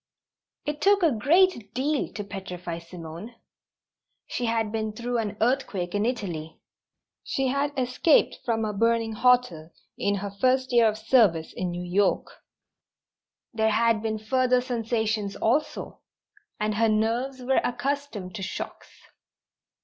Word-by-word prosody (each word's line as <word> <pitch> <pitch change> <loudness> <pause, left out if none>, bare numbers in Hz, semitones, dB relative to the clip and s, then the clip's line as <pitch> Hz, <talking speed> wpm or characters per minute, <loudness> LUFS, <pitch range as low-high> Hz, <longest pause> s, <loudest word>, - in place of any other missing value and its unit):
It 295 0 -3
took 400 -1 +4
a 325 - +5
great 280 - +2
deal 285 +3 0
to 205 - -4
petrify 180 -4 -6
Simone. 170 +6 -9 0.9
She 245 - -3
had 225 -2 0
been 220 -1 -2
through 240 +2 -2
an 210 -2 -3
earthquake 220 -8 0
in 205 +2 +1
Italy. 170 -10 -4 0.6
She 270 -1 -1
had 280 +2 0
escaped 255 +5 +3
from 225 -2 0
a 210 - -2
burning 230 +1 +1
hotel 235 -9 +2 0.3
in 200 0 +1
her 200 0 -4
first 255 +5 +1
year 235 -2 +6
of 215 0 0
service 215 -8 +3
in 180 - -3
New 175 +1 -4
York. 195 +3 +1 1.2
There 220 -1 +2
had 225 0 +2
been 220 -1 -2
further 255 +3 +2
sensations 225 -4 -1
also, 290 +7 -1 0.6
and 215 0 0
her 225 +1 +2
nerves 235 +5 0
were 265 +2 +2
accustomed 245 -6 -3
to 215 - -6
shocks. 190 - -6
225 Hz, 135 wpm, -26 LUFS, 205-255 Hz, 1.2 s, year